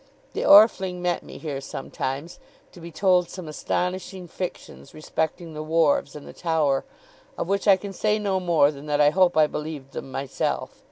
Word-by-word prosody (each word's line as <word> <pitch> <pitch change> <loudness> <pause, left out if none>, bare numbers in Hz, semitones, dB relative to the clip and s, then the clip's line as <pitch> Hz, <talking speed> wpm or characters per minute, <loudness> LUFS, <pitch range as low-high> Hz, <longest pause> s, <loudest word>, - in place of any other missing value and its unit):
The - - -3
Orfling 200 -3 +6
met 175 -1 -1
me - - -11
here 145 -4 -5
sometimes, 135 +3 -5 0.3
to 175 - -14
be 170 +1 -9
told 180 0 +2
some 180 -3 -8
astonishing 180 +4 -3
fictions 175 -5 -7
respecting 160 +2 -3
the 155 - -5
wharves 155 -3 +1
and 150 - -10
the - - -10
Tower; 155 -5 0 0.5
of - - -3
which 200 +2 -1
I 195 -2 +7
can 195 +1 -7
say 210 +2 +1
no 200 -3 0
more 170 -5 +3
than 145 0 -11
that 145 0 0
I 145 0 +5
hope 180 -1 +3
I 155 - +7
believed 150 -3 -6
them 135 - -7
myself. 135 0 -2
165 Hz, 180 wpm, -24 LUFS, 150-185 Hz, 0.5 s, I